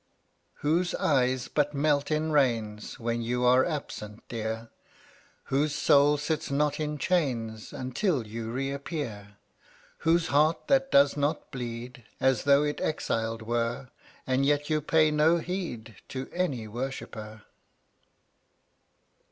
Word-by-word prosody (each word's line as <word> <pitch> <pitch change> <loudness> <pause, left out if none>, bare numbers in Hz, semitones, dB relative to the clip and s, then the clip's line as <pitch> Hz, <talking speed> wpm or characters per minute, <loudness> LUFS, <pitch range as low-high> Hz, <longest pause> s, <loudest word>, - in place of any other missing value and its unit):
95 - - -26
Whose 170 +4 +1
eyes 130 -3 +1
but 150 0 0
melt 145 0 +2
in 155 +1 0
rains 115 -7 0
When 115 0 -1
you 125 +2 0
are 125 +1 +6
absent, 110 -9 -5
Dear? 115 0 -4 0.7
Whose 145 +2 0
soul 150 -1 +5
sits 155 +2 -2
not 145 +1 +1
in 150 -1 -2
chains 125 -11 -1
Until 130 - -1
you 115 +1 -5
reappear? 135 -6 -4 0.6
Whose 165 +1 +2
heart 155 +3 +2
that 270 0 +3
does 140 0 +5
not 145 +1 -1
bleed 120 0 -6 0.2
As 130 -3 +2
though 140 +1 +5
it 150 0 -2
exiled 115 -6 -1
were? 120 +3 -2 0.4
And 130 +1 +1
yet 145 +2 +1
you 155 0 +2
pay 155 +1 +3
no 155 +3 +4
heed 160 - -5
To 130 0 -5
any 140 -11 -1
worshipper. 110 -3 -6
140 Hz, 125 wpm, -28 LUFS, 115-150 Hz, 0.7 s, are